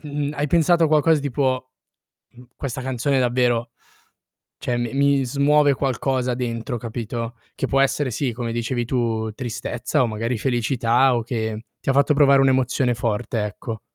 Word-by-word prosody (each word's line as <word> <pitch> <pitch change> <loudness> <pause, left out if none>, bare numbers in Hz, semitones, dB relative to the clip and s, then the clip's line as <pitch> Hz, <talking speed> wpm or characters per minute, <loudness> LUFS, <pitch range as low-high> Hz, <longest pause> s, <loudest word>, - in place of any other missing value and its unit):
mh, 145 0 -2
mh, - - -4
hai 145 +1 -1
pensato 170 +1 +4
a - - +2
qualcosa 155 0 +3
tipo: 130 -2 -1 0.6
"Mhmm, 125 +1 -15
questa 135 -1 -5
canzone 130 +1 0
davvero, 120 -1 +1 0.9
cioè 120 -1 -2
mi 120 0 -3
mi 140 -1 +2
smuove 145 +2 +3
qualcosa 130 -2 -1
dentro" 120 0 -3
capito? 115 +1 -5 0.2
Che - - -1
può 135 0 +2
essere, 135 -1 +1
sì 125 +2 -1
come 115 0 -4
dicevi, 120 +1 -2
tu 115 -3 -1
tristezza 120 +4 -2
o - - +1
magari 115 +2 -2
felicità 120 +1 +2
o 115 - -1
che 110 -2 -3 0.2
ti - - -4
ha - - +3
fatto 140 +2 +3
provare 140 -1 +5
un'emozione 130 -1 +2
forte, 115 0 -2
ecco. 105 +2 -5
125 Hz, 165 wpm, -22 LUFS, 115-140 Hz, 0.9 s, provare